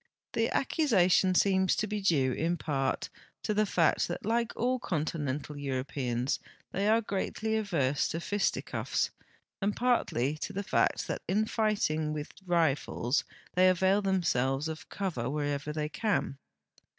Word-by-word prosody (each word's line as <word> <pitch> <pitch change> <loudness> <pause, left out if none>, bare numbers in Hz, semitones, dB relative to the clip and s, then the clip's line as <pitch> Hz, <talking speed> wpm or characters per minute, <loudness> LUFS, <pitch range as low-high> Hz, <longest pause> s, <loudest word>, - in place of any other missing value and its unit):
The 225 0 +1
accusation 190 - +3
seems 190 0 +3
to 215 - 0
be 210 0 -3
due 140 -9 +2
in 170 +5 0
2)art 135 -5 -1 0.3
to 210 - 0
the 210 0 +2
fact 165 -5 +2
that 175 - -5
like 235 +1 +1
all 255 +2 +1
continental 150 - -2
Europeans 130 -2 -2 0.3
the}" 200 +2 0
are 225 +2 +4
greatly 220 +1 -2
averse 155 -11 +1
to 165 - -3
fisticuffs, 205 +4 -1 0.5
and 200 +1 0
j>artly 155 - +1
to - - -4
the 200 - -2
fact 215 - +1
that - - -3
in 210 +3 +2
fighting 200 -9 0
with 150 -1 -5 0.2
rifles 155 -5 +1 0.3
they 185 +1 +5
avail 190 +2 +3
themselves 150 -8 +1
of 160 -1 -7
cover 160 -12 -2
whenever 145 0 -2
they 150 0 -2
can. 190 -9 -1
175 Hz, 140 wpm, -30 LUFS, 145-205 Hz, 0.5 s, they